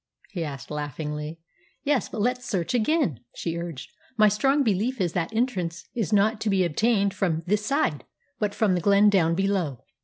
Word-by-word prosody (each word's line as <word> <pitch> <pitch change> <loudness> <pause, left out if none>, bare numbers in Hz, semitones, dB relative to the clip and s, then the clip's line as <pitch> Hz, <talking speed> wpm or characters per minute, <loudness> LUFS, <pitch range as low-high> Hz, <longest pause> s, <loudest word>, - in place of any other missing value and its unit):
he 180 -5 -3
asked 140 -4 -7
laughingly. 150 +1 -4 0.5
"Yes, 280 -6 +1
but 215 - -4
let's 250 +3 0
search 190 +4 -1
again," 245 - +1 0.2
she 165 -1 -3
urged. 170 -5 -6 0.3
"My 215 -1 +6
strong 270 +8 +2
belief 225 +3 0
is 175 -3 0
that 170 0 -1
entrance 190 -8 -2
is 225 -6 -2
not 210 +2 +3
to 215 - 0
be 190 -2 +3
obtained 200 +4 +2
from 175 -4 -1
this 210 +3 +1
side, 215 - 0 0.4
but 205 -1 -1
from 210 -4 +2
the 180 - 0
glen 200 +3 +5
down 165 -4 +3
below." 190 - -1
195 Hz, 180 wpm, -25 LUFS, 165-220 Hz, 0.5 s, My